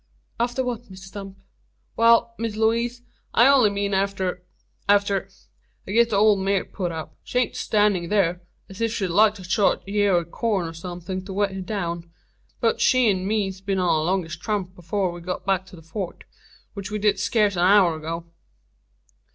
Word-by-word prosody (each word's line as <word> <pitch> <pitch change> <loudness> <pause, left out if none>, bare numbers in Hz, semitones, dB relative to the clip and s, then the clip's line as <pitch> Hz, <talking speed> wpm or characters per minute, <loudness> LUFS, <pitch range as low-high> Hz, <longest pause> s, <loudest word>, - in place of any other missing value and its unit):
"After 245 +2 0
what, 240 -3 -5
Mr 190 - -10
Stump?" 195 +1 -9 0.6
"Wal, 230 0 +4
Miss 225 -2 -2
Lewaze, 235 +2 0 0.3
I 235 - +7
only 270 -6 +6
meened 200 0 -2
arter 190 -2 -1 0.5
arter 200 -1 +2 0.6
I - - -7
git 235 +2 +4
the 215 - 0
ole 210 0 +5
mare 195 0 0
put 180 -4 -4
up. 160 -1 -7
She - - -4
air 250 - +1
stannin' 205 -5 +1
thur, 180 -4 +1 0.3
as 195 +1 -10
if 230 -1 +1
she'd 195 -5 -2
like 210 +4 +4
to 190 - -10
chaw 195 +2 +3
a - - -21
yeer 200 -1 +2
o' 170 -1 +1
corn, 190 0 -1
an - - -9
somethin' 175 +2 -6
to 195 - -6
wet 200 0 +1
it 190 -1 -6
down. 170 -5 -3 0.5
Both 230 - +1
she 250 -5 +4
'nd 185 0 -3
me's 195 -3 -1
been 195 0 -1
on 180 -3 +2
a - - -1
longish 170 -2 -1
tramp 190 -3 -3
afore 180 +2 -2
we 175 0 -9
got 180 +1 -5
back 190 -1 0
to 180 - -12
the 165 - -14
Fort; 175 +3 -6 0.5
which 200 -2 -6
we 210 - -2
did 205 -1 +2
scace 205 -1 +2
a - - -2
hour 185 -2 +5
ago." 165 +2 -5
195 Hz, 190 wpm, -24 LUFS, 180-215 Hz, 0.6 s, I